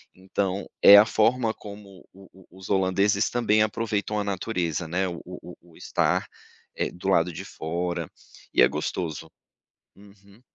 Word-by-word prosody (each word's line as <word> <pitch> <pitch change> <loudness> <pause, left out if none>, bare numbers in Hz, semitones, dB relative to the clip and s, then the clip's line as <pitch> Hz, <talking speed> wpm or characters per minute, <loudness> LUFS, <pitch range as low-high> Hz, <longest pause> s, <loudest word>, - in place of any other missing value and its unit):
então 95 +1 -3
é 100 - +10
a 105 - +8
forma 115 +1 +1
como 100 -2 -12
o 95 0 -16
o 95 0 -19
os 95 - -10
holandeses 100 +2 +2
também 110 -3 +2
aproveitam 105 -1 -2
a - - -1
natureza, 90 -5 -3
né, 95 +3 -1
o 85 -2 -6
o 90 -1 -10 0.2
o - - -19
estar, - - 0 0.5
eh, - - -2
do 90 +2 -5
lado 90 -2 +2
de - - -7
fora, 85 +2 -4 0.4
e - - +4
é 60 - +8
gostoso. 80 +3 -4 0.7
Uhum. 100 +1 -19
95 Hz, 155 wpm, -25 LUFS, 90-105 Hz, 0.7 s, é